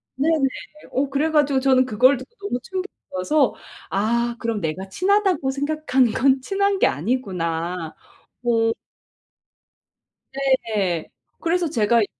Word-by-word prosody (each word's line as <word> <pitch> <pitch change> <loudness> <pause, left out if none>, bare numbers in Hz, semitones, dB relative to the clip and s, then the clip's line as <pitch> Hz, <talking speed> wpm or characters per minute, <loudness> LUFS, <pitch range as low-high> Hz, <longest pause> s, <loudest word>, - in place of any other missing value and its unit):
네네. 295 0 +2 0.4
어 275 +2 0
그래 285 +3 +1
가지고 290 -3 +3
저는 260 -1 +4
그걸 255 +4 +4
듣고 260 - -12
너무 245 - -2
충격이어서 310 - -1 0.4
'아 235 +4 0
그럼 230 -2 -2
내가 180 +4 -3
친하다고 370 - +2
생각한 285 -2 +1
건 265 +3 +3
친한 395 +5 0
게 - - +5
아니구나.' 170 - -2 0.5
뭐 225 -2 +2 1.9
네. 190 -7 -1 0.3
그래서 340 0 +1
제가 230 -4 +3
이 205 - 0
255 Hz, 240 characters per minute, -22 LUFS, 210-300 Hz, 1.9 s, 게